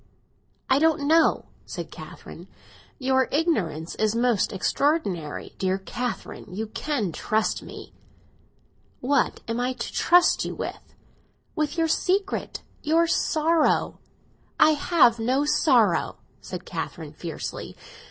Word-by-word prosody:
"I 265 - +4
don't 320 -1 +3
know!" 325 +2 +4 0.2
said - - -6
Catherine. - - -11 0.5
"Your 260 -1 +1
ignorance 205 - 0
is 215 0 0
most 235 -3 +2
extraordinary! 195 - -1
Dear 190 0 +1
Catherine, 240 +5 -5
you 210 +5 -3
can 220 - -2
trust 215 +6 -1
me." - - -11 1.1
"What 270 +1 +1
am 230 +1 -2
I 250 +1 0
to 240 -2 -6
trust 355 0 +4
you - - -4
with?" - - -7 0.6
"With 305 +2 -1
your 325 -1 +2
secret—your 335 -3 0
sorrow." 320 -1 +1 0.6
"I 310 - +7
have 290 -6 +3
no 260 +5 +1
sorrow!" 245 - +3 0.3
said - - -7
Catherine - - -6
fiercely. - - -6
265 Hz, 115 wpm, -25 LUFS, 220-315 Hz, 1.1 s, I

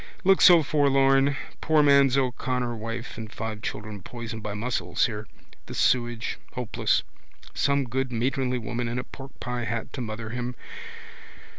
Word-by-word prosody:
Looks 195 0 +6
so 175 -3 +8
forlorn. 135 -1 +3 0.2
Poor 155 -2 +4
man 140 -1 +6
O'Connor 125 -2 -1
wife 115 +1 -6
and 110 -1 -7
five 110 -2 -5
children 105 -2 -5
poisoned 115 +1 -7
by 105 -1 -4
mussels 120 +4 0
here. 110 -2 -4 0.4
The - - -7
sewage. 120 -2 +1
Hopeless. 125 -3 0 0.5
Some 140 0 +2
good 130 +1 -2
matronly 125 +2 0
woman 120 +1 -3
in 120 +1 -3
a 125 - -2
porkpie 125 -3 -6
hat 115 -1 -3
to 130 - -4
mother 110 -1 -5
him. 125 +1 -4
125 Hz, 145 wpm, -26 LUFS, 115-135 Hz, 0.5 s, so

